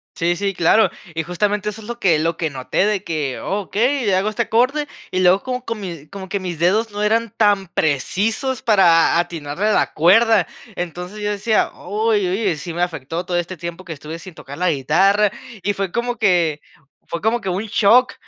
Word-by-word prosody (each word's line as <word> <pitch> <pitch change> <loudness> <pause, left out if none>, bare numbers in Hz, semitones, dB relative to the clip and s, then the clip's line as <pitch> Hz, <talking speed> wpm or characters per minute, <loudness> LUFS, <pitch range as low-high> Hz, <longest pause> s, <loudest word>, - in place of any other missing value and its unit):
Sí, 170 +1 +1
sí, 200 +1 -2
claro. 185 +4 +4 0.2
Y 165 - -1
justamente 205 +4 -1
eso 215 +1 -8
es 210 - -12
lo 240 0 -6
que 170 -5 +3
lo 165 +1 -1
que 160 -2 -1
noté, 135 +9 -1
de 205 -2 0
que, 150 -7 -3
okey, 225 +6 -1
le 195 -2 +3
hago 195 +3 +1
este 235 +2 -1
acorde, 260 +7 +1 0.2
y 185 - 0
luego 185 +1 +4
co 250 -1 -3
comi 185 - -6
como 195 -1 -8
que 200 - -2
mis 180 -3 -5
dedos 205 +7 +2
no 205 +1 -3
eran 225 +1 +1
tan 205 -3 +3
precisos 205 - -1
para 170 -6 +4
atinarle 170 +2 -2
a 215 - +3
la - - +1
cuerda. 200 +3 +4 0.3
Entonces, 180 +4 -6
yo 205 - -1
decía: 210 +2 +1
"Uy, 210 0 0
oye 190 -2 0
sí 165 +4 -6
me 175 - -3
afectó 165 0 -3
todo 175 -1 0
este 175 +1 -3
tiempo 170 +2 -7
que 165 - -5
estuve 155 +3 -8
sin 185 0 -11
tocar 140 -2 -10
la 180 0 +2
guitarra", 190 +9 +3 0.3
y 205 - 0
fue 195 -2 -3
como 240 +2 -2
que 170 -7 +2 0.5
fue 170 0 -4
como 225 +3 +1
que 195 - -8
un 185 +4 -1
shock, 230 +5 +4
190 Hz, 205 wpm, -20 LUFS, 170-215 Hz, 0.5 s, claro